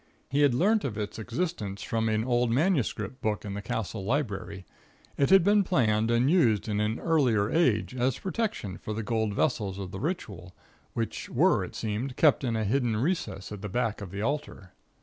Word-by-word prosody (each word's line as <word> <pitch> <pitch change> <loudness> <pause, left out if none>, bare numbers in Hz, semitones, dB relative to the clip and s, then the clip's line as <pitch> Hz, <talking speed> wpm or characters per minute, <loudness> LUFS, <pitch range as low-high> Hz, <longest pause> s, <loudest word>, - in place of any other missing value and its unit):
He 140 +2 +2
had 140 -4 +4
learnt 210 - +3
of 115 -6 -3
its 105 +1 -4
existence 110 - -3
from 110 +2 0
an 110 0 +1
old 120 -1 +1
manuscript 130 - 0
book 105 -1 -1
in 100 - -4
the 100 - -4
Castle 100 0 -4
library. 100 -6 -2 0.5
It 140 - +2
had 190 -1 +7
been 205 +2 +4
planned 115 - +2
and 120 +2 +3
used 125 - +3
in 105 -1 -1
an 105 +2 0
earlier 125 -11 +2
age 125 -10 +2
as 125 0 0
a - - -16
protection 190 - -3
for 110 - -5
the 110 - -3
gold 110 -2 -1
vessels 100 -9 0
of 95 -2 -6
the 95 - -6
ritual, 100 - -4 0.4
which - - -3
were, - - +3
it - - -8
seemed, 115 +5 -3
kept 150 -3 +4
in 120 -3 0
a 110 - 0
hidden 115 +1 +1
recess 130 - -2
at 105 -2 -7
the 105 - -5
back 115 0 -1
of 100 - -6
the 100 +3 -4
altar. 135 -9 -3
115 Hz, 200 wpm, -28 LUFS, 105-140 Hz, 0.5 s, had